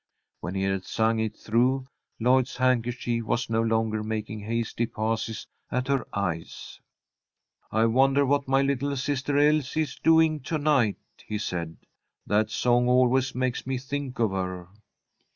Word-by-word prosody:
When 90 - -5
he 95 - -1
had 95 -1 -1
sung 110 +1 0
it 110 -1 -2
through, 130 +4 +1 0.3
Lloyd's 125 +2 +2
handkerchief 120 -2 0
was 120 +1 -1
no 115 0 +2
longer 110 -1 0
making 110 0 -4
hasty 115 +2 -2
passes 110 0 -3 0.3
at 125 +1 -1
her 135 -2 0
eyes. 90 -5 -4 0.9
"I 110 +2 +3
wonder 135 +4 +3
what 140 +1 +1
my 135 +1 +3
little 140 +1 -1
sister 140 +1 -1
Elsie 150 0 +3
is 150 -4 -3
doing 160 -1 +4
to 150 +4 -3
night," 145 -8 +2 0.3
he 105 - -2
said. 85 -5 -4 0.5
"That 105 +1 +1
song 120 +2 +2
always 130 +1 +3
makes 130 0 -2
me 135 -1 -1
think 135 0 -5
of 115 -4 +1
her." 90 -2 -4
120 Hz, 150 wpm, -26 LUFS, 110-135 Hz, 0.9 s, doing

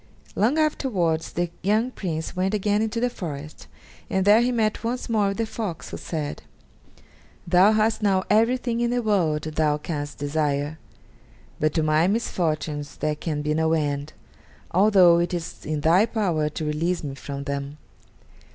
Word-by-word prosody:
Long 235 +9 +2
afterwards 200 - 0
the 175 0 -2
young 215 +6 +1
Prince 160 -8 -4
went 190 +3 0
again 205 +1 +1
into 225 +1 -1
the 245 - +2
forest, 155 - -7 0.4
and 190 0 0
there 210 +3 +6
he 245 +1 +2
met 220 -3 0
once 245 +2 -2
more 215 -3 +2
with 195 - -2
the 230 - 0
fox, 210 -7 -5
who - - -5
said: 150 -3 -4 1.0
"Thou 185 +4 +5
hast 220 +1 +1
now 195 -3 +2
everything 235 +2 +2
in 240 0 +1
the 245 0 0
world 175 -8 +1
thou 155 -1 0
canst 145 -2 -5
desire, 145 +1 -1 0.8
but 155 0 +1
to 160 - +2
my 155 +2 +3
misfortunes 155 -8 -2
there 155 - -1
can 150 -1 -3
be 150 0 0
no 160 +1 +1
end, 145 -1 -1 0.6
although 185 -3 +6
it 175 +1 0
is 170 -3 -7
in 155 -1 -2
thy 175 +8 +4
power 175 -10 0
to 155 +1 -5
release 165 +4 -1
me 140 -2 -4
from 140 +1 -6
them." 140 0 -4
175 Hz, 165 wpm, -24 LUFS, 150-215 Hz, 1.0 s, there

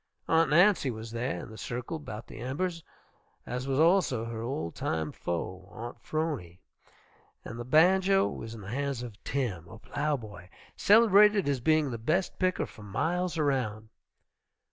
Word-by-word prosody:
Aunt 165 -2 +4
Nancy 175 -2 +5
was 110 -1 -6
there, 120 +3 -2
in - - -10
the 110 - -10
circle 125 +6 -4
about 110 -7 -8
the - - -11
embers, 165 +7 -3 0.6
as 125 +2 -4
was 135 0 0
also 160 -9 +3
her 115 -1 -5
old 115 - -3
time 80 -1 -2
foe, 95 +2 -4
Aunt 120 +2 -8
'Phrony, 145 - -3 0.9
and 115 - -7
the - - -3
banjo 190 +8 +4
was 115 0 -6
in 110 - -9
the 95 - -9
hands 135 0 -2
of 115 -4 -10
Tim, 105 -12 -2
a 110 - -11
plow 145 +5 -1
boy, 105 -6 -11 0.3
celebrated 210 -3 +6
as 140 -2 +1
being 155 +1 +2
the 115 - -4
best 165 +11 0
picker 185 -1 +1
for - - -14
miles 165 - -1
around. 125 -8 -1
130 Hz, 165 wpm, -29 LUFS, 110-165 Hz, 0.9 s, celebrated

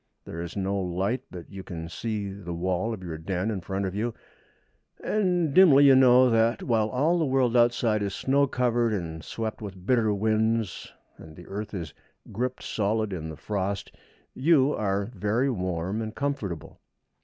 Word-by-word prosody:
There 85 - -6
is 85 +3 -6
no 100 0 -1
light, 95 +7 -1
but 90 0 -10
you 95 -1 -7
can 85 -3 -7
see 100 +3 -4
the 90 -4 -6
wall 90 +5 -1
of 105 -5 -6
your 80 -3 -6
den 95 +5 -2
in 100 -4 -3
front 95 +3 -3
of 95 - -3
you, 110 +3 -2 0.9
and 180 -7 +1
dimly 145 -6 +7
you 135 - +8
know 130 -1 +6
that, 115 +1 +2
while 110 -3 +1
all 155 +8 +2
the 160 - +2
world 130 -2 +2
outside 120 -2 +3
is 100 -2 -2
snow 140 +1 +2
covered 120 -3 +1
and 80 -5 -4
swept 110 -1 -5
with 95 -3 -8
bitter 115 -3 +3
winds, 110 -1 0 0.3
and 80 -1 -12
the 90 - -12
earth 105 +3 -6
is 85 -6 -5 0.4
gripped 125 +4 -3
solid 110 0 -1
in 80 -3 -5
the 80 - -8
frost, 100 -3 -3 0.4
you 145 0 +3
are 100 +1 -1
very 110 +7 0
warm 95 0 -2
and 110 0 -5
comfortable. 110 - -4
105 Hz, 175 wpm, -26 LUFS, 95-120 Hz, 0.9 s, you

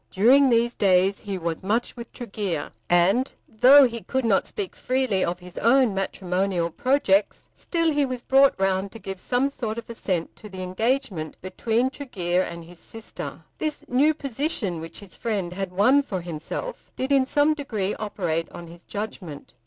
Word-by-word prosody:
During 260 +8 +5
these 235 0 +2
days 190 0 +3
he 200 -2 -5
was 165 -2 -3
much 215 +5 -1
with 235 -1 -9
Tregear; 200 - -4 0.2
and 180 +9 +3 0.2
though 260 +6 +7
he 235 -1 -6
could 260 +2 -2
not 200 -4 +2
speak 405 -3 -5
freely 255 -7 0
of 175 +1 -1
his 180 0 -9
own 245 -1 +4
matrimonial 185 -2 -1
projects, 250 - +1
still 330 -2 0
he 290 -1 +2
was 255 -2 -3
brought 270 -4 +4
round 195 0 0
to - - -8
give 195 -3 -7
some 250 +6 +1
sort 230 -5 -4
of 235 - -6
assent 185 -7 -3
to 210 - -11
the 190 -1 -7
engagement 185 - -1
between 225 +7 -1
Tregear 185 -11 -1
and 170 -2 -6
his 175 0 -14
sister. 225 -1 -8 0.2
This 305 -1 -3
new 290 +5 +3
position 260 - -2
which 165 +4 -8
his 200 -3 -12
friend 200 -6 -2
had 195 0 -4
won 220 +10 +4
for 195 -10 -4
himself 170 - -6
did 260 +2 -3
in 270 -2 +4
some 295 +2 +3
degree 220 -10 -3
operate 175 -6 -2
on 175 - -9
his 170 +1 -13
judgment. 190 -8 -7
210 Hz, 175 wpm, -24 LUFS, 185-260 Hz, 0.2 s, though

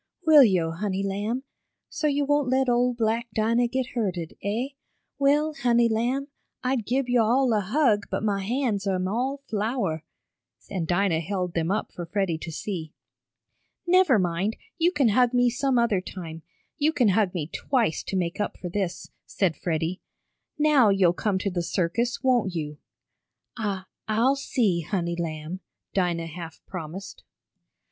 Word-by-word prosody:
"Will 310 -3 +9
yo', 180 -7 +2
honey 190 +3 -2
lamb? 205 +6 -2 0.4
So 305 - -1
yo' 285 0 +1
won't 290 -2 +2
let 260 +1 +2
ole 245 +1 +3
black 230 +1 0
Dinah 230 +2 +2
get 260 +1 -2
hurted, 185 -9 -2
eh? 225 +7 -1 0.5
Well, 295 +3 +3
honey, 240 -4 +3
lamb, 245 +6 0 0.3
I'd 255 -4 0
gib 260 +2 +1
yo' 245 -2 +3
all 245 +2 +3
a 215 - +3
hug 210 0 +2
but - - -2
mah 205 -2 +1
hands 210 -1 -1
am 185 -1 0
all 260 +7 -1
flour," 210 - -1 0.7
and 180 -5 -2
Dinah 175 -1 +2
held 180 +1 -3
them 165 0 0
up 205 +3 -1
for 175 -1 -7
Freddie 185 -3 -1
to 165 - -6
see. 165 -2 -5 0.9
"Never 360 -7 +5
mind, 185 +3 0 0.2
you 340 +2 +4
can 280 -9 +3
hug 245 +3 +3
me 245 -1 +4
some 265 +1 +1
other 230 -5 +2
time 165 -3 -8 0.4
you 305 +2 +3
can 255 -8 +3
hug 195 -1 +2
me 160 -4 -1
twice 230 - 0
to - - -3
make 180 +1 -1
up - - -3
for 180 - -6
this," 185 -1 -3 0.2
said 185 -5 0
Freddie. 165 +1 -2 0.6
"Now 295 -7 +5
you'll 190 -3 +4
come 200 +1 0
to 195 +1 -2
the 175 -1 -1
circus, 185 +9 -1
won't 240 -8 +2
you?" 150 -2 -4 0.8
"I 205 -5 -2 0.2
I'll 230 +5 +3
see, 235 -10 +1
honey 170 0 -2
lamb," 165 +1 -4 0.3
Dinah 175 -3 0
half 165 0 -8
promised. 185 +2 -7
210 Hz, 160 wpm, -26 LUFS, 180-250 Hz, 0.9 s, Will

